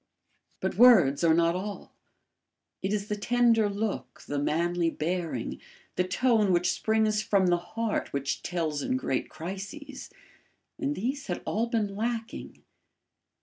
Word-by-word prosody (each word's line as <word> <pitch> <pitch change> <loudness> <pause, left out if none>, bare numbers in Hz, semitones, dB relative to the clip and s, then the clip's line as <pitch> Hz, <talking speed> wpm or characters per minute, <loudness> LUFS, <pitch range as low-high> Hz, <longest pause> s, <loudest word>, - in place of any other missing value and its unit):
But - - -2
words 175 - +7
are 160 -1 +5
not 170 0 +3
all; 200 +2 -6 0.9
it 190 - -1
is 205 -1 -1
the 210 - -1
tender 230 0 +3
look, 205 +1 -4
the 145 - -2
manly 170 +3 +1
bearing, 165 -6 -3 0.3
the 180 - +2
tone 215 +1 +2
which 175 0 +3
springs 220 -1 +1
from 200 -3 +2
the 175 -1 +3 0.2
heart 230 -2 -1
which 140 0 -2
tells 160 -4 -2
in 255 - 0
great 135 - -2
crises; 195 - -7 0.7
and 290 0 -1
these 270 +6 -3
had - - -3
all 225 +3 0
been 215 -4 -1
lacking. 230 +1 -4
200 Hz, 140 wpm, -28 LUFS, 170-225 Hz, 0.9 s, words